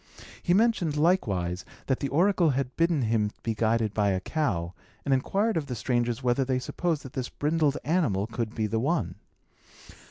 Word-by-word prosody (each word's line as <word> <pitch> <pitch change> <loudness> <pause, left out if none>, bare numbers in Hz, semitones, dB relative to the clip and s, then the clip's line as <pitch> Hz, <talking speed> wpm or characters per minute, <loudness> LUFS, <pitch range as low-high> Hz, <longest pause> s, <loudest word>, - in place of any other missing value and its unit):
He 175 - +2
mentioned, 195 -9 +2
likewise, 95 - +1 0.2
that 130 - 0
the 140 - -1
oracle 175 +3 +3
had 135 -2 -1
bidden 165 -4 +2
him 110 -2 +1
be 115 - -1
guided 110 -1 +1
by 105 -1 +2
a 95 -1 +1
cow, 95 - -2 0.3
and 140 - +2
inquired 195 - +1
of 150 -3 -2
the 125 - -4
strangers 120 +1 -1
whether 125 +2 +2
they 130 0 0
supposed 160 +4 -2
that 130 - -10
this 130 -1 -3
brindled 150 -1 +1
animal 145 - +1
could 115 0 -4
be 110 - 0
the 110 +1 -1
one. 155 +8 0
130 Hz, 180 wpm, -27 LUFS, 110-160 Hz, 0.3 s, oracle